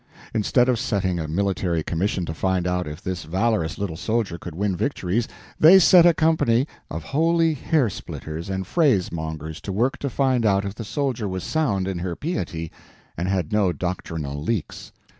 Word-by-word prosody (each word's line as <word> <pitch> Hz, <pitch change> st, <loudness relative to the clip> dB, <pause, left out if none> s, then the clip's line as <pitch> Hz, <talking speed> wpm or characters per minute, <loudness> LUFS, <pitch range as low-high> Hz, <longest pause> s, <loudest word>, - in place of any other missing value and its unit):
Instead 120 Hz, +3 st, +2 dB
of 125 Hz, -3 st, +2 dB
setting 95 Hz, -4 st, 0 dB
a 80 Hz, -, -3 dB
military 90 Hz, -1 st, 0 dB
commission 90 Hz, +3 st, -1 dB
to 80 Hz, -, -4 dB
find 95 Hz, +1 st, 0 dB
out 90 Hz, -1 st, -1 dB
if 75 Hz, 0 st, -8 dB
this 95 Hz, -1 st, -3 dB
valorous 95 Hz, -1 st, 0 dB
little 100 Hz, -5 st, -3 dB
soldier 105 Hz, -2 st, -1 dB
could 85 Hz, -3 st, -8 dB
win 100 Hz, +1 st, 0 dB
victories, 115 Hz, -1 st, -1 dB, 0.3 s
they 170 Hz, +5 st, +9 dB
set 180 Hz, -1 st, +7 dB
a 170 Hz, -, +6 dB
company 150 Hz, -6 st, +2 dB, 0.2 s
of -, -, -5 dB
holy 165 Hz, +2 st, +2 dB
hair 150 Hz, -1 st, +1 dB
splitters 80 Hz, -3 st, -6 dB
and 95 Hz, 0 st, -2 dB
phrase 125 Hz, -, +2 dB
mongers 80 Hz, -1 st, -5 dB
to 100 Hz, -, -5 dB
work 120 Hz, +7 st, 0 dB
to 140 Hz, -, -2 dB
find 130 Hz, -2 st, +1 dB
out 100 Hz, -2 st, +2 dB
if 100 Hz, -, -4 dB
the 115 Hz, -, -7 dB
soldier 125 Hz, -2 st, -2 dB
was 95 Hz, -1 st, -4 dB
sound 110 Hz, -13 st, 0 dB
in 95 Hz, -2 st, -3 dB
her 90 Hz, -1 st, -3 dB
piety 85 Hz, -, -4 dB, 0.4 s
and 85 Hz, +3 st, -2 dB
had 95 Hz, -4 st, -1 dB
no 100 Hz, -4 st, +3 dB
doctrinal 80 Hz, -4 st, -4 dB
leaks. 100 Hz, +1 st, -3 dB
95 Hz, 180 wpm, -23 LUFS, 85-125 Hz, 0.4 s, they